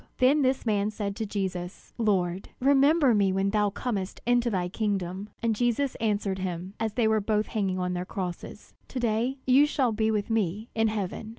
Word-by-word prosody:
Then 275 +4 +4
this 260 -1 +1
man 210 -2 +1
said 205 -2 -4
to 220 - -3
Jesus: 185 -3 -4
"Lord, 190 -4 0
remember 280 +1 +4
me 200 -3 +3
when 195 +1 0
thou 210 -1 +2
comest 200 -3 -4
into 245 0 +3
thy 185 -5 -1
kingdom!" 195 0 -2
And 225 -1 +2
Jesus 245 +4 +1
answered 205 -3 0
him, 185 0 -4
as 220 -1 -1
they 230 -1 +2
were 220 -1 +2
both 210 +1 +1
hanging 195 -4 -1
on 180 0 -1
their 180 0 -2
crosses: 180 -1 -6
"To 260 - -5
day 240 +3 0
you 270 +3 +5
shall 265 -5 +1
be 220 0 +1
with 215 0 -1
me 215 0 -1
in 225 0 +2
heaven." 215 0 -3
215 Hz, 190 wpm, -27 LUFS, 195-235 Hz, -, you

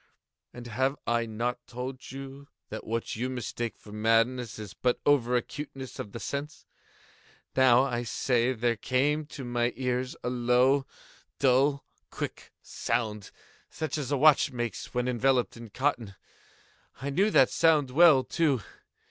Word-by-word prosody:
And 120 -1 -10
have 130 +4 0
I 115 0 +1
not 120 +3 -2
told 125 +2 -7
you 135 +1 -9 0.2
that 110 - -7
what 115 +1 -2
you 125 +4 -2
mistake 120 -2 -4
for 105 - -14
madness 115 +2 +1
is 105 -4 -8
but 125 -1 0
over 125 -4 +3
acuteness 135 +1 -5
of 100 - -6
the 115 - -7
sense?—now, 130 -3 -1
I 120 -3 -1
say, 120 +1 +1
there 120 -1 0
came 145 +6 0
to 140 -3 -8
my 120 0 0
ears 125 0 -2
a - - -1
low, 125 +3 +3 0.5
dull, 140 +2 +3 0.2
quick - - -6
sound, 110 -3 -2 0.4
such 155 -3 -4
as 140 -2 -4
a 145 - +2
watch 145 0 +5
makes 120 -2 -4
when 125 0 -1
enveloped 125 0 +1
in 115 -1 -10
cotton. 120 -4 -1 0.8
I 140 +2 -3
knew 195 +9 +3
that - - +5
sound 150 -5 +3
well, 155 -2 +6
too. 140 -4 +1
125 Hz, 145 wpm, -28 LUFS, 120-135 Hz, 0.8 s, well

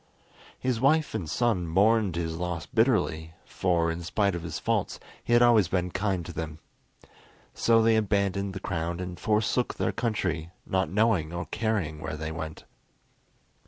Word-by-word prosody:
His 125 -3 -1
wife 155 +3 +3
and 95 -8 -3
son 95 -1 +1
mourned 100 +2 +3
his 80 -1 -2
loss 90 -2 -3
bitterly, 90 -10 +1
for, 85 -3 0
in 85 +1 -5
spite 100 +3 0
of 85 - -4
his 85 -1 -5
faults, - - -1 0.2
he 120 - -1
had 120 0 +6
always 115 -6 +5
been 90 0 -1
kind 95 -3 -1
to 85 - -7
them. 80 -1 -5 1.0
So 115 -1 +3
they 115 0 +4
abandoned 100 -2 0
the - - -4
crown 85 -2 -3
and 90 -1 -6
forsook 110 +3 +1
their - - 0
country, 95 -9 -2 0.2
not 95 -4 0
knowing 100 -5 +2
or 85 +1 -4
caring 100 -9 -2
where 75 -1 -5
they 80 +1 -4
went. 80 -1 -6
95 Hz, 160 wpm, -27 LUFS, 85-110 Hz, 1.0 s, had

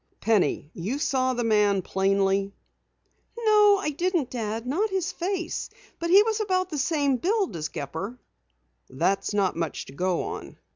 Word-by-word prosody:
Penny, 190 -8 +1
you 200 +11 -3
saw 260 -3 0
the 240 - -1
man 210 -4 +3
plainly?" 195 +1 +1 0.8
"No, 420 -3 +5
I 345 -6 -2
didn't, 340 -3 -1
Dad. 225 -1 -3
Not 360 - 0
his 375 -2 -1
face. 360 -1 -3 0.3
He 370 +5 +6
was 445 0 -1
about 370 -3 0
the 300 - -2
same 285 -3 +1
build 390 - 0
as 155 -2 -3
Gepper." 160 - -5 0.7
"That's 195 +9 0
not 200 -3 +1
much 165 -3 -3
to - - -12
go 180 +3 0
on." - - -7
255 Hz, 150 wpm, -26 LUFS, -, 0.8 s, He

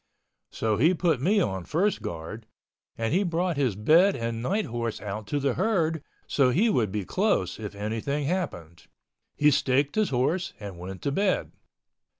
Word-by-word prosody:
So 110 -2 -1
he 160 - +4
put 165 -6 +1
me 200 +8 +3
on 95 - -1
first 190 - 0
guard, 85 +7 -6 0.5
and 115 +3 -1
he 185 - +3
brought 175 -1 0
his 130 -8 0
bed 165 - +4
and 115 -1 -3
night 200 - 0
horse 115 -1 -3
out 105 0 -6
to 145 - -1
the 135 -2 +1
herd 165 - +1 0.2
so 135 -3 +3
he 210 - +3
would 110 - +1
be 105 -1 -3
close 185 - 0
if 105 -2 -6
anything 115 +8 -2
happened. 90 - -4 0.5
He 150 0 +4
staked 140 +1 +2
his 215 -1 +1
horse 140 +8 0
and 100 -4 -8
went 95 +1 -8
to 140 - 0
bed. 195 +5 0
135 Hz, 170 wpm, -27 LUFS, 105-175 Hz, 0.5 s, he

